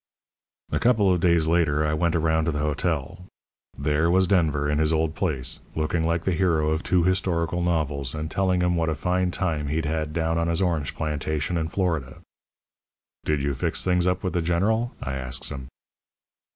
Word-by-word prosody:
"A - - 0
couple 110 -6 +3
of 90 - 0
days 85 -2 +3
later 80 -3 +2
I 75 - 0
went 85 +2 +1
around 80 -1 +1
to 80 - +1
the 75 - -4
hotel. 75 0 -2 0.6
There 75 +3 +1
was 95 +2 +4
Denver 80 -6 +1
in 75 0 0
his 80 0 +2
old 80 -1 +1
place, 75 - -2 0.2
looking 80 +1 0
like 85 0 0
the 95 - 0
hero 80 -4 +1
of 80 +1 0
two 90 -2 +2
historical 90 -2 0
novels, 75 -6 0
and 75 +1 -4
telling 95 -2 +1
'em 90 0 +2
what 80 -1 0
a 80 - -1
fine 90 +2 0
time 80 -5 -2
he'd 80 +2 -1
had 80 0 -2
down 80 +1 0
on 85 - 0
his 85 0 0
orange 85 -6 -1
plantation 75 +1 -2
in 80 -1 -1
Florida. 80 -7 -2 1.1
"'Did 75 -2 0
you 70 0 0
fix 65 - -1
things 90 -1 +2
up 90 - 0
with 95 - -2
the 90 - +1
General?' 105 +8 +1
I 65 - -3
asks 65 -1 -2
him. 65 -2 -7
80 Hz, 190 wpm, -25 LUFS, 75-90 Hz, 1.1 s, was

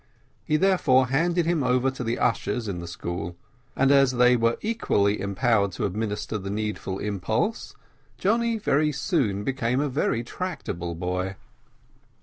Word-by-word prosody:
He 155 -1 +1
therefore 140 -9 +3
handed 170 +5 +1
him 170 -2 +1
over 125 +1 +2
to 130 -1 -6
the 115 0 -1
ushers 115 0 0
in 95 -3 -3
the 85 - -7
school, 85 0 -5 0.4
and 135 +1 +3
as 135 -2 +5
they 125 0 +5
were 115 0 +1
equally 105 - +1
empowered 100 0 +1
to - - -2
administer 105 +2 -3
the 95 0 -6
needful 105 -2 -3
impulse, 105 - -2 0.4
Johnny 230 +3 +1
very 150 -7 +2
soon 135 - 0
became 125 0 0
a 145 0 0
very 125 -3 0
tractable 120 - -5
boy. 90 +2 -2
120 Hz, 145 wpm, -25 LUFS, 100-145 Hz, 0.4 s, as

